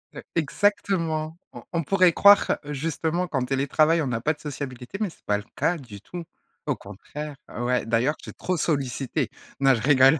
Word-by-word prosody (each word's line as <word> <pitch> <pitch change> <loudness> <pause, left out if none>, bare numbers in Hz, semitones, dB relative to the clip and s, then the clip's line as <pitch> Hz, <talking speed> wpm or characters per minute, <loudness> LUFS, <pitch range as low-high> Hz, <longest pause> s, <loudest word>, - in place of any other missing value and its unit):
Heu, - - -6
exactement! 165 -2 0 0.2
On - - -9
on 170 -2 0
pourrait 185 0 +4
croire 200 0 +6
justement 160 +4 -1
qu'en 135 -5 -1
télétravail 145 +5 +3
on 145 - -1
n'a 115 -2 -1
pas 155 +5 +2
de - - -20
sociabilité, 135 0 -6
mais 210 - +1
c'est - - -19
pas 105 0 +2
le 105 - -7
cas 165 +4 +1
du 110 -8 -11
tout. 175 +10 -7 0.4
Au - - +1
contraire. 145 +9 -8 0.2
Ouais, 125 +1 +1
d'ailleurs 120 +6 +2
tu - - -11
es - - -8
trop 185 -1 -2
sollicité. 135 -5 -1 0.3
Non 135 -1 +5
je 110 - -3
rigole! 135 +2 +6
150 Hz, 190 wpm, -25 LUFS, 130-165 Hz, 0.4 s, croire